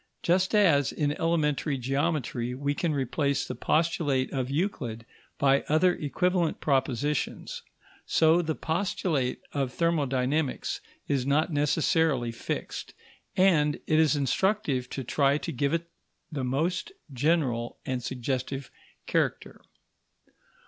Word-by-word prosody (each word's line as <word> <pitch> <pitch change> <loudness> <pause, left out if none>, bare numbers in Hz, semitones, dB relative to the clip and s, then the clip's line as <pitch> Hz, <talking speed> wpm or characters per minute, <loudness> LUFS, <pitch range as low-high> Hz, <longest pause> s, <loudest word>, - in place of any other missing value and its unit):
Just 185 +4 +2
as, 160 -10 +4
in 145 -1 0
elementary 155 -3 +1
geometry, 130 -1 -1
we 140 +2 -1
can 165 +2 -1
replace 140 0 0
the - - -4
postulate 145 -1 +1
of 130 -2 -1
Euclid 135 - -2 0.3
by 140 0 +4
other 175 +4 +4
equivalent 175 +3 0
propositions, 135 +1 -1 0.5
so 160 +2 +4
the 160 -2 -2
postulate 160 -6 -1
of 135 -3 -1
thermodynamics 145 -3 0 0.3
is 135 -2 0
not 155 +4 +2
necessarily 150 -3 +2
fixed, 115 - -5 0.4
and 155 -6 +4
it 155 - +3
is 155 -1 +4
instructive 145 - 0
to 135 - -4
try 140 +3 +2
to - - -4
give 140 +2 0
it 170 0 -1 0.4
the 140 -4 -3
most 160 - -1 0.2
general 130 -4 0
and 130 -3 -2
suggestive 130 +2 -3 0.3
character. - - -1
145 Hz, 115 wpm, -28 LUFS, 130-165 Hz, 0.5 s, as